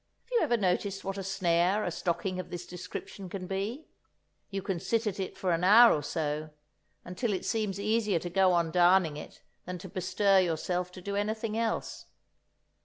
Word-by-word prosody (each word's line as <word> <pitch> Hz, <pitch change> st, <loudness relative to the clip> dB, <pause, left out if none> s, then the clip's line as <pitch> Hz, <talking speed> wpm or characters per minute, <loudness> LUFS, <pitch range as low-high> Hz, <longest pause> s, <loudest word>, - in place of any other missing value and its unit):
Have 475 Hz, -, -32 dB
you 480 Hz, -, +3 dB
ever 240 Hz, -, +2 dB
noticed 195 Hz, 0 st, 0 dB
what 195 Hz, 0 st, -4 dB
a -, -, -4 dB
snare 185 Hz, +1 st, +1 dB
a 175 Hz, -, -2 dB
stocking 185 Hz, +2 st, -2 dB
of 185 Hz, -, -6 dB
this 175 Hz, 0 st, -6 dB
description 180 Hz, +2 st, -8 dB
can 185 Hz, 0 st, -5 dB
be? 205 Hz, -, -3 dB, 0.6 s
You 195 Hz, -1 st, -4 dB
can 190 Hz, -3 st, -2 dB
sit 225 Hz, +6 st, 0 dB
at 205 Hz, -2 st, -2 dB
it 190 Hz, -, -4 dB
for 185 Hz, -, 0 dB
an 170 Hz, +1 st, 0 dB
hour 225 Hz, +5 st, +8 dB
or 150 Hz, -, -2 dB
so, 150 Hz, +1 st, -3 dB, 0.6 s
until 210 Hz, +6 st, -2 dB
it 185 Hz, -, -3 dB
seems 210 Hz, -4 st, -1 dB
easier 215 Hz, -2 st, +1 dB
to 175 Hz, +2 st, -4 dB
go 190 Hz, 0 st, +4 dB
on 170 Hz, -2 st, +1 dB
darning 175 Hz, -2 st, +4 dB
it 150 Hz, -, -10 dB, 0.2 s
than 180 Hz, 0 st, -5 dB
to 180 Hz, +2 st, -9 dB
bestir 195 Hz, +1 st, +2 dB
yourself 180 Hz, +1 st, -1 dB
to 185 Hz, -, -10 dB
do 200 Hz, +1 st, -3 dB
anything 215 Hz, +1 st, -2 dB
else. 225 Hz, 0 st, -2 dB
190 Hz, 190 wpm, -29 LUFS, 175-205 Hz, 0.6 s, hour